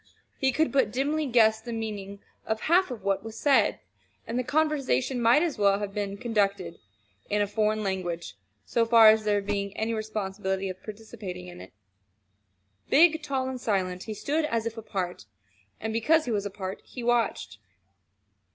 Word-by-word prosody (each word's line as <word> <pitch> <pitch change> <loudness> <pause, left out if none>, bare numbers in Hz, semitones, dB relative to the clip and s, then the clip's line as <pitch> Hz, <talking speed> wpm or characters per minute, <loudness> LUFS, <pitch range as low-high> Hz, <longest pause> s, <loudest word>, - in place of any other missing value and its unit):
He 265 -1 +2
could 315 +5 +1
but 270 -7 +2
dimly 290 +5 0
guess 220 -3 +4
the 235 +1 -7
meaning 205 -3 -5 0.2
of 220 0 -1
half 355 +2 +3
of 235 -6 -7
what 195 0 0
was 225 0 -8
said; 270 -8 +3 0.5
and 235 +2 -2
the - - 0
conversation 275 -3 0
might 235 +7 +5
as 330 -10 -2
well 200 -1 +4
have 205 -1 -5
been 200 -1 -3
conducted 200 -7 -1 0.5
in 210 - +1
a 205 - +3
foreign 215 +1 0
language 180 -3 -3 0.3
so 235 - +1
far 225 -1 +7
as 215 0 +3
there 205 -1 +1
being 200 -1 -3
any 225 +1 -1
possibility 195 -3 -3
of 185 - -6
his - - -33
participating 210 -4 -8
in 175 0 -11
it. - - -12 1.2
Big, 320 +2 +5
tall, 270 -3 -2
and 260 -1 -5
silent, 185 -5 -1
he 215 - -5
stood 300 +9 -1
as 230 -5 -1
if 230 -1 -3
apart. 190 - -4 0.5
And 220 0 -3
because 310 +8 +3
he 245 - -2
was 205 -2 -1
apart 190 -1 -6
he 245 - -9
watched. 230 - 0
220 Hz, 175 wpm, -27 LUFS, 200-245 Hz, 1.2 s, far